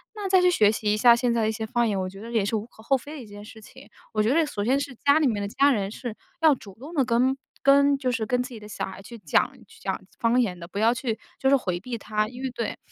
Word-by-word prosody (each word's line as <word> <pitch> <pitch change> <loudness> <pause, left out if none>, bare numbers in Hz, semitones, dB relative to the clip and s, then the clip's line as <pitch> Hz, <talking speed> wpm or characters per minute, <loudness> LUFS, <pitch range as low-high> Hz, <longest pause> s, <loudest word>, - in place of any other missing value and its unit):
那 410 -2 -4
再 375 -1 +5
去 360 - +5
学 215 -10 +4
习 210 -1 0
一 210 - 0
下 235 +1 +7
现 240 0 +1
在 230 - +1
的 220 - +1
一 - - +1
些 220 0 -4
方 235 +1 +1
言， 200 -2 -1
我 185 - -2
觉 195 +2 -12
得 230 - -8
也 220 -4 +1
是 215 - -1
无 215 0 -2
可 230 - -18
厚 270 - +3
非 290 +4 -10
的 280 - -7
一 - - -10
件 205 0 -11
事 220 +1 -12
情。 - - -15 0.2
我 215 - +2
觉 235 +5 +2
得 330 0 +3
首 250 -9 -4
先 260 +6 +2
是 280 -2 -5
家 285 +4 +3
里 305 - +3
面 215 -4 -1
的 200 - -2
家 280 +5 +3
人 200 -5 0
是 235 -1 -6 0.3
要 315 -2 +6
主 200 -6 -13
动 295 +7 -9
地 280 - +3
跟 250 +2 +2 0.3
跟 280 0 +5
就 255 -2 -1
是 225 -2 -1
跟 250 +1 +1
自 250 - -8
己 230 -3 -9
的 210 - -11
小 210 - -4
孩 190 0 -9
去 235 +4 -11
讲 215 - +1 0.2
去 - - -18
讲 - - -2 0.2
方 235 +2 +3
言 185 -8 0
的， 170 - -8
不 190 - -9
要 225 +2 +4
去 235 -2 -3 0.2
就 265 - +2
是 275 - +6
回 180 -8 -3
避 235 +4 -5
他。 215 0 -1
因 245 +3 -9
为 265 - -1
对， 230 -2 -4
235 Hz, 340 characters per minute, -25 LUFS, 210-265 Hz, 0.3 s, 下